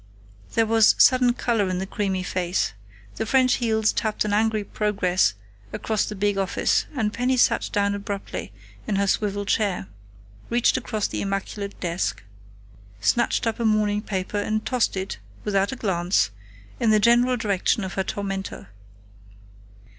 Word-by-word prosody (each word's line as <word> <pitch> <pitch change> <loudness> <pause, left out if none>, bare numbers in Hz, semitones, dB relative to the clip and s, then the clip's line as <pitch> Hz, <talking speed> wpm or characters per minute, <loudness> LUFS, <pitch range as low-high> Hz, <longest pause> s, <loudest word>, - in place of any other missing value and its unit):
There 225 - +4
was 225 -1 +5
sudden 255 -1 +5
color 225 -5 0
in 185 - -1
the 190 - -2
creamy 190 -2 -2
face. 180 - -1 0.4
The 220 - -1
French 255 0 +3
heels 220 -2 +2
tapped 215 -1 -1
an 205 - -1
angry 215 0 +1
progress 195 - +1 0.4
across 220 -2 -1
the 210 - -6
big 205 0 0
office, 190 -1 +1
and 215 -5 0
Penny 250 +2 +1
sat - - +3
down 200 0 +1
abruptly 200 0 -5 0.4
in 210 - 0
her 200 +1 +2
swivel 205 +1 0
chair, 200 - 0 0.6
reached 240 0 +3
across 215 -3 -2
the - - -4
immaculate 200 +1 -4
desk, 165 - -2 0.8
snatched 105 - +1
up 225 0 -1
a - - -1
morning 210 -1 +2
paper 195 -1 -3
and 215 +1 -1
tossed 245 -6 0
it, 190 - -4 0.2
without 200 -1 +1
a - - -4
glance, 185 - +1 0.5
in 230 - +2
the 215 0 +5
general 240 +3 +4
direction 205 -1 0
of 190 - -5
her 190 - -1
tormentor. 195 - -5
205 Hz, 155 wpm, -24 LUFS, 195-225 Hz, 0.8 s, was